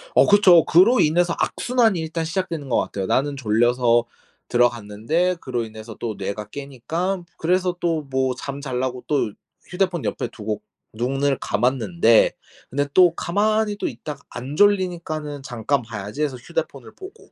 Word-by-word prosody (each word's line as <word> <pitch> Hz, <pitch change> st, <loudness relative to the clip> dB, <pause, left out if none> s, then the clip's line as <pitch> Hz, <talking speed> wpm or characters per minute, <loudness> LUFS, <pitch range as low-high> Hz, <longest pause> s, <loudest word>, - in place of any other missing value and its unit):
어 -, -, +6 dB
그쵸. 190 Hz, -5 st, +7 dB
그로 200 Hz, +10 st, +5 dB
인해서 170 Hz, +3 st, +3 dB
악순환이 230 Hz, -7 st, +1 dB
일단 160 Hz, +1 st, -3 dB
시작되는 165 Hz, -4 st, -3 dB
것 120 Hz, -, +2 dB
같아요. 95 Hz, -2 st, -3 dB
나는 140 Hz, +1 st, +1 dB
졸려서 120 Hz, 0 st, +2 dB, 0.4 s
들어갔는데 120 Hz, -, +1 dB
그로 125 Hz, -2 st, -2 dB
인해서 110 Hz, 0 st, -9 dB
또 115 Hz, -3 st, -3 dB
뇌가 100 Hz, +1 st, -5 dB
깨니까 160 Hz, -, -4 dB
그래서 180 Hz, +1 st, +1 dB
또 165 Hz, -3 st, 0 dB
뭐 130 Hz, -1 st, 0 dB
잠자려고 130 Hz, -2 st, -4 dB
또 140 Hz, -8 st, 0 dB, 0.4 s
휴대폰 180 Hz, -3 st, -1 dB
옆에 -, -, -2 dB
두고 105 Hz, -1 st, -5 dB, 0.3 s
눈을 135 Hz, +4 st, 0 dB
감았는데 115 Hz, -4 st, +3 dB, 0.4 s
근데 145 Hz, +2 st, 0 dB
또 175 Hz, -3 st, +6 dB
가만히 210 Hz, +4 st, +1 dB
또 -, -, -2 dB
있다가 140 Hz, +4 st, -7 dB
안 130 Hz, +4 st, -7 dB
졸리니까는 170 Hz, -7 st, +1 dB
'잠깐 130 Hz, +1 st, -1 dB
봐야지.' 110 Hz, +3 st, -6 dB
해서 145 Hz, -4 st, 0 dB
휴대폰을 -, -, -5 dB
보고 395 Hz, +4 st, -13 dB
140 Hz, 330 characters per minute, -22 LUFS, 120-175 Hz, 0.4 s, 그쵸